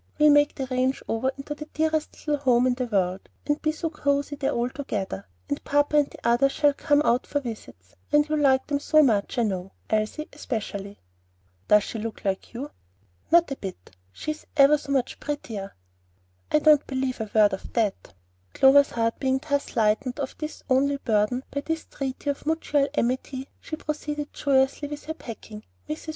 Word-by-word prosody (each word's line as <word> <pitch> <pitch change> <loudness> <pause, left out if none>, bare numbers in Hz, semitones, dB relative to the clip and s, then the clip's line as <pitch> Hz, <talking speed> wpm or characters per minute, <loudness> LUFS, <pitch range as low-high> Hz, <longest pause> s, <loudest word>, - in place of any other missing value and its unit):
We'll 300 0 +6
make 290 0 +4
the 270 - -3
ranch 255 +1 0
over 250 +4 0
into 275 +2 -5
the 300 +1 -9
dearest 315 0 0
little 300 -1 +1
home 250 -2 +4
in 255 - +3
the 250 0 -3
world, 190 -3 -1 0.2
and 295 0 0
be 310 - +1
so 315 +1 -3
cosey 285 -1 0
there 275 -1 -1
all 240 +1 -1
together, 195 - -4 0.2
and 145 - -3
papa 290 +1 +2
and 290 -1 +3
the - - -13
others 265 +4 +3
shall 290 -1 +3
come 290 +1 +2
out 245 -2 +2
for 290 - 0
visits; 215 - -9 0.2
and 295 0 +4
you'll 305 0 0
like 265 -2 +4
them 285 -1 -1
so 310 +1 +4
much, 220 -3 +1
I 240 - +3
know, 190 -3 -3 0.2
Elsie 220 +8 0
especially." 205 -7 -5 0.7
"Does 210 -1 +6
she 225 - -5
look 220 -1 -6
like 195 -1 -2
you?" 270 +5 -6 0.6
"Not 340 -3 +5
a - - -1
bit; 185 - -8 0.2
she's 305 - -6
ever 285 +1 +6
so 280 -1 -7
much 265 -3 0
prettier." 225 -9 -5 0.8
"I - - +5
don't 300 -1 +5
believe 260 -2 -2
a 220 - -4
word 210 -2 +5
of 190 - -6
that" 215 - -1 0.4
Clover's 280 +1 +6
heart 230 -1 -1
being 265 -1 +1
thus 285 0 0
lightened 225 +4 +1
of 270 -2 -3
its 305 0 -5
only 280 +1 +2
burden 230 0 +1
by 280 - -2
this 325 +2 -3
treaty 275 +1 -3
of 285 - -9
mutual 300 -3 +1
amity, 260 +1 -1
she 315 - -6
proceeded 300 -1 -4
joyously 270 +1 +1
with 295 0 -7
her 315 - -3
packing. 220 -6 -9 0.2
Mrs. 310 +1 -5
270 Hz, 190 wpm, -25 LUFS, 230-295 Hz, 0.8 s, We'll